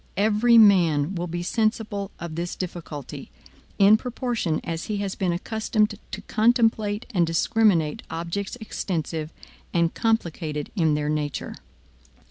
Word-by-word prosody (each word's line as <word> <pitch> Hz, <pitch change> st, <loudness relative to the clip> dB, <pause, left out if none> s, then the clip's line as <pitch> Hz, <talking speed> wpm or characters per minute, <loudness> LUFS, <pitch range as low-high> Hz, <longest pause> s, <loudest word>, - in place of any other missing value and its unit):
Every 215 Hz, +3 st, +4 dB
man 175 Hz, -7 st, +5 dB
will 175 Hz, -1 st, -3 dB
be 175 Hz, +1 st, -4 dB
sensible 215 Hz, -1 st, -1 dB
of 170 Hz, -1 st, -6 dB
this 170 Hz, +2 st, -4 dB
difficulty, 165 Hz, -6 st, -7 dB, 0.5 s
in 205 Hz, +2 st, +7 dB
proportion 235 Hz, -8 st, -2 dB
as 165 Hz, 0 st, -4 dB
he 210 Hz, -, -2 dB
has 200 Hz, -1 st, -2 dB
been 185 Hz, -2 st, -1 dB
accustomed 215 Hz, +4 st, 0 dB, 0.2 s
to -, -, -6 dB
contemplate 225 Hz, -2 st, +2 dB
and 175 Hz, -4 st, +2 dB
discriminate 165 Hz, -2 st, +2 dB
objects 170 Hz, +6 st, -4 dB
extensive 165 Hz, -7 st, -3 dB, 0.4 s
and 170 Hz, -1 st, +2 dB
complicated 170 Hz, -9 st, -1 dB
in 160 Hz, -6 st, +2 dB
their 150 Hz, 0 st, -1 dB
nature. 150 Hz, -1 st, -2 dB
185 Hz, 125 wpm, -24 LUFS, 165-215 Hz, 0.5 s, in